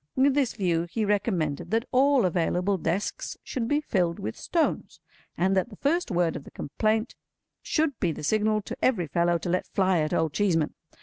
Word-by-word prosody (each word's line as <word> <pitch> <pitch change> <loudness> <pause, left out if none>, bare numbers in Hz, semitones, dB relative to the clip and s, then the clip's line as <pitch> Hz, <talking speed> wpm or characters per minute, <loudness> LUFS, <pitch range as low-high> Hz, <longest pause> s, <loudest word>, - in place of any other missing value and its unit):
With 270 +1 +4
this 275 -3 +1
view 175 -4 0
he 220 +4 -1
recommended 190 -8 0
that 225 +3 +1
all 265 -2 +4
available 180 +2 +1
desks 175 +6 -2
should 240 -4 -3
be 290 +4 +1
filled 180 - 0
with 110 - -5
stones, 335 -2 -1 0.4
and 190 +2 +2
that 190 +5 +1
the 210 - -11
first 320 - 0
word 175 -4 +1
of - - -6
the - - -12
complaint 220 - -1 0.5
should 305 -3 0
be 175 - +1
the 150 - -7
signal 215 +4 +1
to - - -6
every 215 -10 +2
fellow 170 +3 +1
to 170 - -5
let 180 +1 0
fly 190 -3 +2
at 155 0 0
Old 160 -2 0
Cheeseman. 165 -7 +1
195 Hz, 190 wpm, -27 LUFS, 170-230 Hz, 0.5 s, With